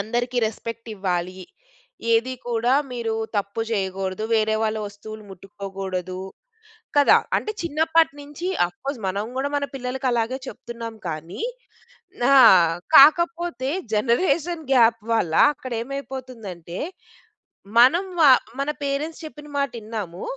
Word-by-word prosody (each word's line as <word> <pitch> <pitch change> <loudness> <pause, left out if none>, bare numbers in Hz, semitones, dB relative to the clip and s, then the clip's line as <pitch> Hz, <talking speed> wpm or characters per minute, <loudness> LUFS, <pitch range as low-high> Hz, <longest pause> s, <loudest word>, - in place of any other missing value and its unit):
అందరికి 240 +4 -2
రెస్పెక్ట్ 230 +1 -5
ఇవ్వాలి. 185 -1 -2 0.7
ఏది 230 +3 +2 0.2
కూడా 240 +2 +2 0.2
మీరు 230 -2 -2 0.2
తప్పు 200 +2 -2
చేయగూడదు. 190 -1 -2
వేరే 220 0 +2
వాళ్ళ 220 0 0
వస్తువులు 215 +1 -10
ముట్టుకోగూడదు. 190 -1 -6 0.8
కదా! 290 -1 +6 0.2
అంటే 430 - -3
చిన్నప్పటి 320 -1 +2
నుంచి 295 +5 -7 0.2
ఆఫ్కోర్స్ 265 +8 -6
మనం 200 +2 -1
గూడా 275 +2 -1
మన 285 - 0
పిల్లలకి 260 0 -3
అలాగే 235 +2 0
చెప్తున్నాం 230 -2 -7
కానీ. 165 - -6 0.9
ఆ! - - +7 0.6
కాకపోతే 335 -1 +5 0.2
జనరేషన్ 310 - +1
గాప్ 230 -2 +4
వల్ల 175 -8 0 0.2
అక్కడ 255 -2 -9
ఏమైపోతుందంటే, 240 -10 -7 1.0
మనం 330 +11 +6
వా 295 -4 +8 0.3
మన 280 - -1
పేరెంట్స్ 295 +4 -3
చెప్పిన 295 -1 -10
మాటిన్నాము. 220 -9 -4
235 Hz, 110 wpm, -23 LUFS, 200-280 Hz, 1.0 s, వా